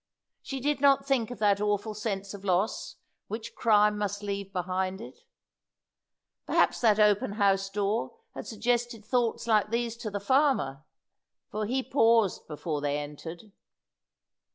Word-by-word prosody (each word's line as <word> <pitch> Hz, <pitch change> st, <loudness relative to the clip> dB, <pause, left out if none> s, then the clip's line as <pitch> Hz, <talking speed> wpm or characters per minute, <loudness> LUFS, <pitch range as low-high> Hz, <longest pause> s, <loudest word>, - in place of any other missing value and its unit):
She 270 Hz, -, -5 dB
did 290 Hz, +1 st, -1 dB
not 275 Hz, -1 st, +4 dB
think 265 Hz, -5 st, +1 dB
of 245 Hz, -, -7 dB
that 205 Hz, -1 st, +2 dB
awful 210 Hz, +1 st, 0 dB
sense 200 Hz, -2 st, -4 dB
of 200 Hz, -1 st, -9 dB
loss 190 Hz, +2 st, 0 dB, 0.3 s
which 220 Hz, +1 st, -6 dB
crime 210 Hz, -2 st, +3 dB
must 205 Hz, 0 st, -3 dB
leave 200 Hz, -1 st, -4 dB
behind 185 Hz, +1 st, -2 dB
it. 235 Hz, -, -10 dB, 1.3 s
Perhaps -, -, +2 dB
that 220 Hz, -4 st, +4 dB
open 210 Hz, -1 st, +3 dB
house 195 Hz, -2 st, +2 dB
door 205 Hz, -, -2 dB, 0.2 s
had -, -, -7 dB
suggested 240 Hz, 0 st, -1 dB
thoughts 235 Hz, -1 st, 0 dB
like 215 Hz, -3 st, +3 dB
these 235 Hz, 0 st, -1 dB
to 230 Hz, -2 st, -5 dB
the 205 Hz, 0 st, -3 dB
farmer, 225 Hz, -, +1 dB, 0.7 s
for 215 Hz, 0 st, -2 dB
he 260 Hz, +3 st, 0 dB
paused 225 Hz, -7 st, +2 dB
before 150 Hz, -1 st, -4 dB
they 145 Hz, 0 st, 0 dB
entered. 160 Hz, +7 st, -8 dB
210 Hz, 145 wpm, -28 LUFS, 195-235 Hz, 1.3 s, not